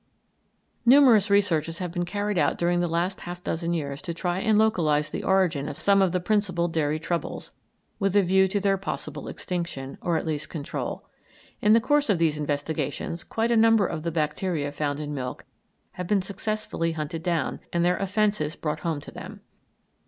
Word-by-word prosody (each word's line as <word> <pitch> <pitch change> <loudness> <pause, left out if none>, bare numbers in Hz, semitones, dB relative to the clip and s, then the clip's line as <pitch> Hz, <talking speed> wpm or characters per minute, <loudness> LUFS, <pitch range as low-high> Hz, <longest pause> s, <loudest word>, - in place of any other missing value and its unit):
Numerous 240 -5 +6
researches 170 -5 +2
have 180 -2 -4
been 175 0 -2
carried 205 +1 -1
out 145 - +2
during 175 0 +1
the 175 - +1
last 170 +3 -1
half 175 0 -7
dozen 170 +1 -2
years 145 -4 -3
to 170 - -5
try 175 +1 -1
and 215 +1 +3
localise 155 -9 +2
the - - -4
origin 180 -7 +2
of 150 +3 -7
some 200 -1 +4
of 190 -2 +3
the 180 - 0
principal 185 -2 +1
dairy 155 -2 0
troubles, 165 +2 -4 0.5
with 195 -1 0
a 205 - +6
view 190 +1 +4
to 205 +2 -1
their 195 -1 +1
possible 155 -6 -5
extinction, 170 -7 -4
or 170 -2 +1
at - - -3
least 155 -1 -3
control. 155 -1 -5 0.6
In 210 - +5
the 230 - +7
course 290 +3 +2
of 200 - +4
these 160 -2 +1
investigations 150 +3 -3
quite 230 +1 -1
a - - +4
number 225 -2 +5
of 160 - -3
the 170 - -2
bacteria 155 -1 -1
found 145 0 -2
in 150 -1 -4
milk 125 -3 -5 0.5
have 180 -1 -6
been 200 -1 +2
successfully 200 -4 -2
hunted 160 +1 -4
down, 170 -4 -1
and 170 0 +1
their 180 +1 +2
offences 195 -5 0
brought 150 -1 -3
home 155 -2 -2
to - - -10
them. - - -9
175 Hz, 190 wpm, -26 LUFS, 155-200 Hz, 0.6 s, the